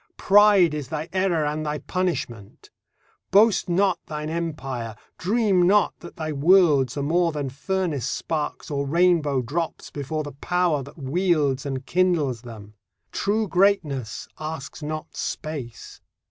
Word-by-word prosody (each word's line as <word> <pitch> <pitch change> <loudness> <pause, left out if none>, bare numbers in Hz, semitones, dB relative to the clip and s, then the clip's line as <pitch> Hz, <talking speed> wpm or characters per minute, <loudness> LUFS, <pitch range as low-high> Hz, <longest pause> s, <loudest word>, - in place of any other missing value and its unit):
Pride 200 -4 +5
is 150 -4 -4
thy 155 +3 -4
error 185 -5 +1
and 150 +1 -2
thy 150 0 -2
punishment. 150 - -4 0.6
Boast 210 -1 +4
not 180 0 +2
thine 150 0 -4
empire, 135 -9 -4 0.2
dream 205 -1 +2
not 205 +2 +4
that 175 - -11
thy 155 -1 -4
worlds 150 -4 +4
Are 140 - -1
more 170 +3 +2
than 145 -4 -4
furnace 160 - -2
sparks 155 -1 -3
or 140 -1 -1
rainbow 160 -4 +2
drops 160 +7 -4
Before 150 +2 -3
the 145 - -7
Power 170 +1 0
that 140 +5 -12
wields 145 -2 0
and 135 -1 -4
kindles 165 -10 +1
them. 110 -4 -11 0.4
True 215 +2 0
greatness 175 - +1
asks 155 -1 -6
not 155 +1 -5
space. 135 -7 -6
155 Hz, 135 wpm, -24 LUFS, 140-180 Hz, 0.6 s, Pride